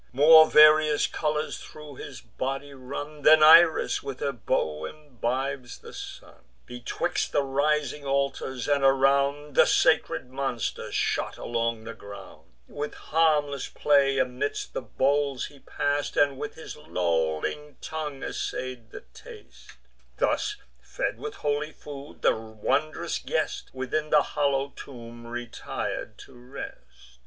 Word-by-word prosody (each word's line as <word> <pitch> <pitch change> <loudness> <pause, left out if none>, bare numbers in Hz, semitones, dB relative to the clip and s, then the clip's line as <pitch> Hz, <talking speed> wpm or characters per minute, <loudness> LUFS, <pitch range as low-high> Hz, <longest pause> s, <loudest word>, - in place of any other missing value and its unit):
More 155 +4 +8
various 155 0 +6
colours 150 0 -2
thro' 150 -1 -11
his - - -9
body 135 +5 -5
run, 145 +3 -7
Than 155 +1 +7
Iris 165 +1 +6
when 135 -2 -6
her 140 - -1
bow 80 - -2
imbibes 130 - -4
the - - -13
sun. - - -10 0.2
Betwixt 125 0 -3
the 145 - +2
rising 145 +1 0
altars, 135 -2 -2
and 145 -1 +2
around, 140 +2 +2
The - - +6
sacred 125 - +2
monster 135 -3 -3
shot - - -1
along 115 -1 -2
the 115 +1 -7
ground; 100 -2 -12 0.2
With 145 +1 -5
harmless 150 -4 +1
play 140 -2 +3
amidst 130 +2 -2
the - - -3
bowls 135 +3 0
he 140 - -13
pass'd, 145 +2 -2
And 140 -2 +3
with 150 0 -5
his 160 - -9
lolling 85 - -2
tongue 150 -3 -5
assay'd 125 -3 -5
the - - -9
taste: 460 -4 -14 0.4
Thus 420 - 0 0.3
fed - - -3
with 435 -1 -6
holy 145 +1 -2
food, 145 0 -11
the - - +4
wondrous 110 +7 -2
guest - - -2
Within 130 +4 -3
the - - +5
hollow 140 -2 0
tomb 120 -2 -10
retir'd 120 0 -5
to - - -18
rest. 125 +2 -8
140 Hz, 130 wpm, -26 LUFS, 125-150 Hz, 0.4 s, More